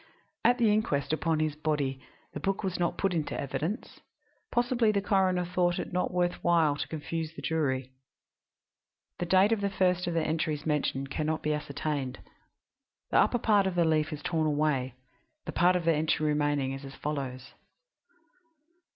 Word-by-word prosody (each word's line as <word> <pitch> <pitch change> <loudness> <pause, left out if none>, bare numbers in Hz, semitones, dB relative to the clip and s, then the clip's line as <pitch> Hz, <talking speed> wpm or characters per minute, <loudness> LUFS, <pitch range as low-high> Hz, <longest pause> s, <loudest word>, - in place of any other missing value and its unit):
At 245 +2 +4
the 225 -4 +4
inquest 150 -10 0
upon 160 0 0
his 155 -1 0
body 150 -4 -1 0.3
the - - -4
book 195 +2 -1
was 185 -2 -2
not 175 -1 0
put 195 -2 0
in 160 -3 -1
evidence; 160 - -4 0.5
possibly 240 -2 +2
the 200 - +1
coroner 190 -3 +2
thought 175 0 +1
it - - -5
not 180 - 0
worth 175 -1 0
while 165 -4 +3
to - - -4
confuse 160 +1 -4
the - - -8
jury. 135 -5 -1 1.3
The 175 - -2
date 190 +4 +5
of 225 -3 +1
the 200 - +1
first 180 -2 +1
of 170 - -1
the 165 - +2
entries 155 -2 -1
mentioned 135 -3 -1
can 155 +1 -2
not 160 0 -1
be 150 - +1
ascertained; 145 -3 -3 0.9
the - - +3
upper 245 - +3
part 210 -4 +3
of 185 - -2
the 170 -1 +3
leaf 155 0 +1
is 150 -1 -6
torn 160 -2 0
away; 145 -4 0 0.5
the - - -4
part 180 +1 +3
of 175 -2 -1
the 165 - +4
entry 155 0 +1
remaining 145 -2 +1
is 135 +1 -6
as 135 0 -9
follows 130 -3 -5
160 Hz, 175 wpm, -29 LUFS, 150-180 Hz, 1.3 s, date